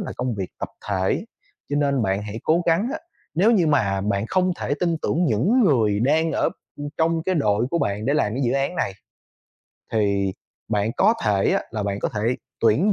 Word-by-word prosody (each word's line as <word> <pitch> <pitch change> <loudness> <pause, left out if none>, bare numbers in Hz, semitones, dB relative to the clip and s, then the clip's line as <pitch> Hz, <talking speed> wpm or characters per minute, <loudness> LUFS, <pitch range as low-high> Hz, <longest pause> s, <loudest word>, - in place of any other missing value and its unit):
là - - -4
công 125 -2 -2
việc 95 -3 -4
tập - - -4 0.2
thể, 95 -2 0 0.5
cho 145 - 0
nên 140 -4 +1
bạn 95 +1 0
hãy 105 +2 -6
cố 170 +3 +3
gắng 170 +8 +2
á 320 - -3 0.4
nếu 195 +7 +4
như 190 -8 +3
mà 105 -10 +2
bạn 100 +1 -1
không 185 +6 +1
thể 145 - 0
tin 170 -2 +1
tưởng 175 +3 +1
những 155 - +2
người 110 - +3
đang 155 +6 +2
ở, - - +2 0.3
ưm, 145 0 -5
trong 165 0 +2
cái 185 +1 0
đội 110 -5 +2
của 170 - +1
bạn 100 -2 -1
để 140 - +2
làm 110 -7 +1
cái 135 - -1
dự 120 - +1
án 140 +6 0
này, 95 - 0 1.0
thì 100 -3 +1 0.4
bạn 105 0 0
có 225 - +4
thể 100 -2 +2
á - - +1
là 110 -2 -3
bạn 100 0 -2
có - - 0
thể 105 - -4 0.4
tuyển 140 - +4
125 Hz, 215 wpm, -23 LUFS, 105-165 Hz, 1.0 s, nếu